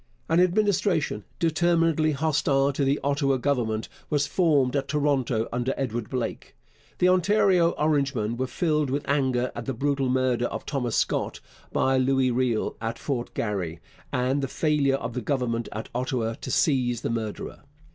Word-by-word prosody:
An 165 - +3
Administration, 185 - +1
determinedly 165 -1 +2
hostile 140 -2 +1
to 140 - -1
the 135 +1 +2
Ottawa 140 -1 +1
Government, 120 -5 -1 0.2
was 145 -1 +1
formed 145 -5 +2
at 140 -1 0
Toronto 135 -6 0
under 125 +2 -1
Edward 120 -4 -3
Blake. 125 -3 -4 0.4
The 180 - +3
Ontario 185 -1 +3
Orangemen 140 -7 +1
were 130 +2 -2
filled 150 +1 0
with 140 +2 -2
anger 130 -3 +1
at 120 - -6
the 135 - -2
brutal 135 +1 0
murder 125 -1 +1
of - - -6
Thomas 125 -5 -2
Scott - - 0 0.3
by 130 0 +2
Louis 130 0 +2
Riel 120 -2 0
at 115 0 -3
Fort 125 -4 -3
Garry 90 -6 -2 0.3
and 130 +3 0
the 135 - -1
failure 145 -1 +1
of 120 -3 -4
the 125 - -3
Government 120 -3 -1
at 110 - -6
Ottawa 120 -2 -1
to 120 - -8
seize 125 -4 +1
the - - -2
murderer. 110 -2 -4
135 Hz, 155 wpm, -26 LUFS, 120-150 Hz, 0.4 s, An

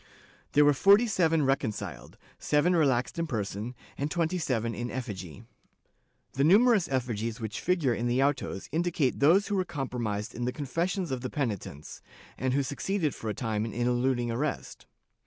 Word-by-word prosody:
There 145 +1 +6
were 145 - +6
forty 200 - +6
seven 165 -8 +2
reconciled, 135 -5 -2 0.2
seven 150 +5 +2
relaxed 135 -2 +1
in 165 - -1
person 110 -1 -4 0.2
and 145 +2 -1
twenty 170 +2 0
seven 115 -7 -1
in 120 +3 -4
effigy.' 100 - -6 0.9
The 135 - +1
numerous 205 - +5
effigies 120 -3 -2
which 110 -2 -4
figure 165 -8 +1
in 120 +1 -2
the 125 +3 +2
autos 135 -8 -1
indicate 165 -4 0
those 175 +9 +4
who 205 - 0
were 190 - +2
compromised 120 - -3
in 120 - -3
the 125 - 0
confessions 165 +5 -2
of 130 -2 -2
the 130 - -4
penitents, 105 - -4 0.3
and 130 0 -1
who 140 - +2
succeeded 155 +4 -1
for 110 - -5
a 105 - -3
time 110 -3 -2
in 110 - -4
eluding 120 0 0
arrest. 145 +6 -4
135 Hz, 165 wpm, -28 LUFS, 120-160 Hz, 0.9 s, There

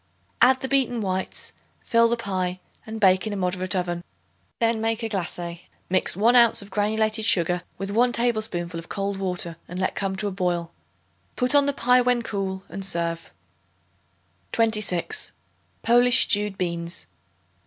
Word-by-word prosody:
Add 260 +1 +5
the 265 - -2
beaten 260 -3 +1
whites; 190 -2 -3 0.3
fill 230 0 +3
the 235 +1 0
pie 185 -4 -3 0.3
and 220 0 -6
bake 190 0 +3
in 215 - -3
a - - -3
moderate 185 0 -1
oven. 175 -1 -2 0.5
Then 230 -1 +1
make 225 +1 -1
a 225 - -2
glacé. 175 -3 -4 0.3
Mix 185 -1 +1
1 230 +4 +4
ounce 235 -4 +5
of 200 - -13
granulated 215 +2 0
sugar 175 -4 +3 0.2
with 195 +1 -4
1 240 +4 +3
tablespoonful 215 -8 -1
of 165 - -12
cold 200 -1 -3
water 180 -3 -1
and 180 - -7
let 185 - 0
come 195 -1 -2
to 205 +2 -2
a - - -3
boil. 175 -3 -2 0.6
Put 250 +2 +2
on 285 -1 +5
the - - +3
pie 250 -2 +3
when 245 -1 +1
cool 195 -3 -4
and 195 - -7
serve. 170 -3 -2 1.2
26. 220 - +1 0.5
Polish 245 +2 +5
Stewed 205 -2 0
Beans. 170 -1 -4
200 Hz, 160 wpm, -24 LUFS, 180-230 Hz, 1.2 s, Add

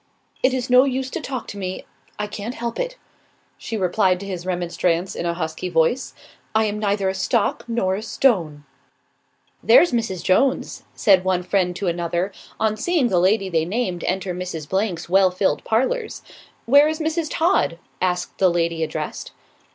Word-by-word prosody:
"It 260 - +3
is 255 -1 -2
no 250 +1 +6
use 265 -1 -2
to 340 - -4
talk 265 -4 -5
to 205 - -7
me, 185 -1 -5 0.3
I 210 - -2
can't 210 +3 -6
help 235 0 -4
it," - - -3 0.6
she 225 - -4
replied 185 -1 +2
to - - -6
his 185 -2 -6
remonstrance, 175 0 -1
in 170 - -3
a 170 - -1
husky 160 +1 -4
voice. 165 +10 +1 0.4
"I 220 0 +4
am 210 0 -2
neither 200 -2 0
a 190 - 0
stock 215 +2 0
nor 230 -5 0
a 195 - -3
stone." 190 - +1 1.0
"There's 355 -8 +6
Mrs. 225 -7 -2
Jones," 260 +8 +1
said 190 -3 +4
one 185 -1 0
friend 180 -1 0
to 195 - -4
another, 175 +2 -1 0.3
on 215 -1 +1
seeing 305 0 +1
the 180 - +2
lady 195 +2 +2
they 165 -3 +1
named 185 -1 -2
enter 185 0 -1
Mrs. 175 -4 -5 0.3
's 160 - -9
well 190 +1 +4
filled 185 +1 0
parlours. 425 - -1 0.4
"Where 285 +5 +6
is 315 +1 -2
Mrs. 320 0 -1
Todd?" 325 - +1 0.2
asked 180 -1 -1
the 190 - +5
lady 170 -1 0
addressed. 155 -1 -4
195 Hz, 175 wpm, -22 LUFS, 180-240 Hz, 1.0 s, no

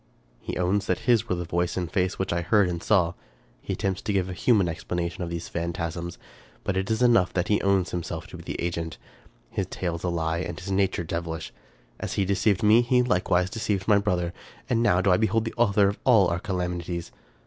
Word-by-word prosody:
He - - -5
owns 95 +3 +1
that - - 0
his 115 0 +2
were 90 - +1
the 85 0 -4
voice 85 +2 -1
and 90 -2 -1
face 90 0 0
which 95 - -1
I 85 - 0
heard 95 +3 +3
and 85 -1 -3
saw. 90 -6 +3 0.5
He - - -3
attempts 95 -1 -2
to 110 - -2
give 95 -2 0
a - - -4
human 100 0 +3
explanation 85 +1 -3
of 85 - -4
these 85 0 -4
phantasms; 85 0 -4 0.5
but 100 - -1
it 95 +2 -1
is 110 +2 +1
enough 115 -7 +4
that 90 -1 -1
he 105 - +3
owns 95 -2 +2
himself 85 -2 -4
to - - -9
be - - -10
the - - -6
agent: 85 -2 -3 0.5
his - - -2
tale 85 -2 -3
is - - -12
a 90 - 0
lie, 85 -1 -1
and 85 -2 -4
his 100 +2 -6
nature 95 -2 +1
devilish. 85 0 -4 0.5
As - - -4
he 100 - +1
deceived 100 +2 +1
me, 110 +3 +6
he 125 +1 +3
likewise 90 -4 +1
deceived 105 -3 -2
my 105 -2 +5
brother, 90 -4 -1 0.3
and 120 -3 +1
now 90 -6 +3
do 95 - +3
I 90 - +5
behold 110 +1 +1
the 115 - -4
author 105 -4 +4
of 100 - -5
all 110 -8 +5
our 85 0 -1
calamities 90 -2 -3
90 Hz, 225 wpm, -26 LUFS, 85-105 Hz, 0.5 s, me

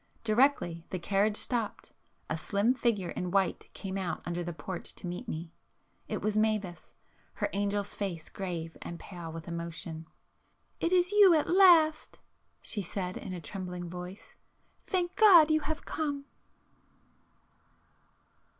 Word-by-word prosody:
Directly 215 -7 +2
the 185 - -3
carriage 200 +4 +1
stopped, 235 -4 -2 0.4
a - - -1
slim 200 +8 +1
figure 220 -8 0
in 180 - -3
white 195 0 0
came 195 -1 -4
out 185 -2 -3
under 175 0 -2
the 175 - -4
porch 170 +3 -5
to - - -9
meet 180 +8 -5
me,—it 165 -3 -8
was 215 0 0
Mavis, 215 -6 -1 0.4
her - - -2
angel's 200 0 -1
face 180 -6 -4
grave 170 -4 -5
and 170 - -6
pale 175 -4 -8
with 165 0 -8
emotion. 170 -1 -6 0.7
"It 335 - 0
is 360 0 +3
you 405 -4 +7
at 305 - +2
last!" 340 -4 +5 0.5
she 210 - -2
said 185 0 -4
in - - -6
a 180 - -4
trembling 180 -1 -6
voice——"Thank 210 - -6
God 350 -8 +8
you 310 - +4
have 315 +1 -4
come!" 285 -3 -3
195 Hz, 135 wpm, -30 LUFS, 175-275 Hz, 0.7 s, God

